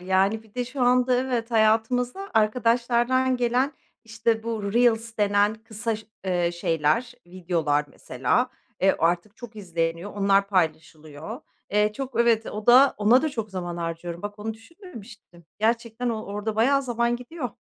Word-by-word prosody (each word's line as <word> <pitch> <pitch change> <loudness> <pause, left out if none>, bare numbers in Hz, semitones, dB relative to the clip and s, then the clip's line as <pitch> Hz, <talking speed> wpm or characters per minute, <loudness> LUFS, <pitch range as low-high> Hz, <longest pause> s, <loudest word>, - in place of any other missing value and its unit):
Yani 190 +4 +1
bir 215 -2 -24
de 250 0 -1
şu 255 +2 -7
anda 250 0 +3
evet, 245 -2 -1
hayatımıza 240 - +1
arkadaşlardan 240 +3 +2
gelen, 245 +4 +1 0.3
işte, 225 0 -1
bu 220 -3 -3
"Reels" 230 -1 +2
denen 205 0 +2
kısa 220 0 -4
ş 215 -1 -14 0.2
eee, 175 -2 0
şeyler, 165 +8 0
videolar 165 -5 -1
mesela, 135 - -1 0.3
eee, 190 +1 +3
artık 175 +5 0
çok 235 -3 -11
izleniyor, 170 0 -3
onlar 200 0 +2
paylaşılıyor. 160 - -3 0.3
Eee, 210 +1 +2
çok 250 -1 -3
evet, 230 -2 +3
o 210 0 -6
da 260 +3 +7
ona 225 +5 +4
da 315 - +1
çok 225 -7 -5
zaman 175 -2 -5
harcıyorum. 170 0 -5
Bak, 205 0 -6
onu 220 +1 -4
düşünmemiştim. 225 - -14
Gerçekten 230 +2 -1
o 220 -2 -2
orada 210 +2 -4
bayağı 275 +5 +3
zaman 240 -1 0
gidiyor. 250 +1 -6
220 Hz, 150 wpm, -25 LUFS, 190-240 Hz, 0.3 s, da